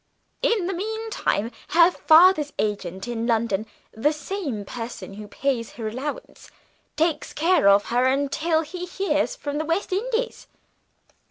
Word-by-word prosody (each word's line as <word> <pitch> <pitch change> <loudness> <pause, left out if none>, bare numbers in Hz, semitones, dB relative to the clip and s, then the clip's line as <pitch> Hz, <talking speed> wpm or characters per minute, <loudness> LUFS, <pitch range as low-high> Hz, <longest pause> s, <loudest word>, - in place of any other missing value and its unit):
In 425 -6 +2
the 385 - -1
meantime, 430 - -2 0.2
her 340 +2 +5
father's 315 -1 +5
agent 190 -2 -3
in 235 -1 -2
London 220 -3 0 0.2
the 260 +7 +1
same 300 - -4
person 230 -2 -7
who 210 +1 -9
pays 250 -1 -2
her 225 -2 -5
allowance 275 - -6 0.5
takes 320 0 0
care 330 - +4
of 200 +1 +5
her 245 +1 +3
until 285 +4 +1
he 360 +3 -6
hears 395 +6 0
from 290 -10 -4
the 315 - -2
West 345 +4 -1
Indies." 470 +4 -2
295 Hz, 140 wpm, -24 LUFS, 230-360 Hz, 0.5 s, her